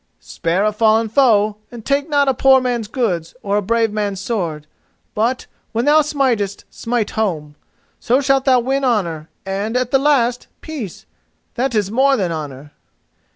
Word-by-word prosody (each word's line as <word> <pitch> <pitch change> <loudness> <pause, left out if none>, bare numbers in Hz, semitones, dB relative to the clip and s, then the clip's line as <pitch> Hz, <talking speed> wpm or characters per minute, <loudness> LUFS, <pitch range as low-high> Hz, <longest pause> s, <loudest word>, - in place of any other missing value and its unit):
Spare 175 +5 -1
a 215 - +2
fallen 220 +1 +2
foe, 215 -4 +3
and 235 -2 -10
take 280 +2 0
not 285 -2 +2
a 270 - +3
poor 265 +2 +5
man's 245 -4 -2
goods 190 -9 -2
or 200 0 0
a - - +1
brave 225 +2 +1
man's 205 -2 -2
sword; 175 -8 -3 0.5
but, 235 +4 -1 0.3
when 230 +2 0
thou 300 +1 +5
smitest, 255 -9 -1
smite 235 -2 -2
home. 160 -9 -2 0.5
So 250 +3 +2
shalt 270 -1 +1
thou 255 -2 +4
win 270 +3 -1
honour, 170 -11 -1 0.2
and, 200 +5 -2
at 250 -1 -1
the 270 - +4
last, 250 -4 +1
peace, 275 - -7 0.5
that 250 0 -1
is 205 -2 0
more 270 +3 +3
than 185 -5 -1
honour." 145 -3 -7
225 Hz, 165 wpm, -18 LUFS, 200-265 Hz, 0.5 s, poor